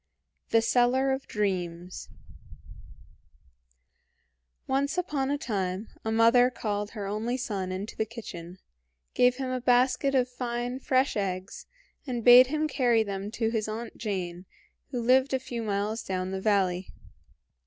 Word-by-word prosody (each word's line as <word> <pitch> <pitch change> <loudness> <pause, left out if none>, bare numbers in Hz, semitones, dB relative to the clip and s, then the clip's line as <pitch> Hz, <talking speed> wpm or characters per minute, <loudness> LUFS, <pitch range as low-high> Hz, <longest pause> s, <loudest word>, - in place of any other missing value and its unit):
THE 225 0 +3
SELLER 250 +3 +3
OF 265 0 -3
DREAMS 180 -4 -3 2.6
Once 280 +4 0
upon 290 -7 -1
a 285 - 0
time 195 -4 -3
a 220 - -2
mother 230 +2 +5
called 205 -4 -3
her 205 - -3
only 215 +5 -2
son 200 -7 -3
into 190 +4 -5
the 220 - -1
kitchen, 185 -6 -9 0.6
gave 250 0 +4
him 260 -1 -3
a 255 -1 -2
basket 250 +2 +3
of 255 -1 +3
fine, 245 0 -4
fresh 260 +1 +1
eggs, 190 -2 -4 0.4
and 240 -3 -3
bade 250 +1 +9
him 310 +3 0
carry 240 -6 +2
them 200 -1 -5
to 225 0 -1
his 220 -2 -1
Aunt 225 +2 -6
Jane, 185 -4 -4 0.4
who 255 -3 -3
lived 260 +3 +3
a - - 0
few 240 -2 -5
miles 210 +1 -2
down 185 -2 -3
the 190 0 -3
valley. 190 -3 +1
230 Hz, 145 wpm, -28 LUFS, 200-255 Hz, 2.6 s, bade